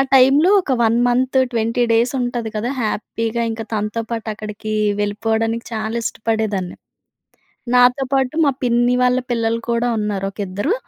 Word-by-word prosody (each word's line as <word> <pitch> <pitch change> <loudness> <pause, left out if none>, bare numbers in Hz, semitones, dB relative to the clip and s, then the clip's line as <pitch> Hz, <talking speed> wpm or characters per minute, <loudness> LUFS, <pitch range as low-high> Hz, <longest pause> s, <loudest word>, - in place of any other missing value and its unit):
టైంలో 275 +7 +5
ఒక 280 - -4
1 225 +1 +3
month, 255 +2 +1 0.2
20 230 +2 +1
days 235 +3 +2
ఉంటుంది 240 -2 -2
కదా! 240 +5 -2
హ్యాపీగా 225 +2 -2
ఇంకా 225 -1 -5
తనతో 215 +2 -2
పాటు 225 -1 -4
అక్కడికి, 215 0 -6 0.3
వెళ్ళిపోవడానికి 225 +2 -1
చాలా 220 +1 -3
ఇష్టపడేదాన్ని. 215 -5 -2 1.0
నాతో 250 +2 +5
పాటు 265 +2 +1
మా 280 - +3
పిన్ని 240 0 +2
వాళ్ళ 250 0 +3
పిల్లలు 230 -1 0
కూడా 235 +1 +1
ఉన్నారు 205 -2 -2
ఒక 205 - -21
ఇద్దరు. 205 - -1
230 Hz, 145 wpm, -19 LUFS, 220-245 Hz, 1.0 s, టైంలో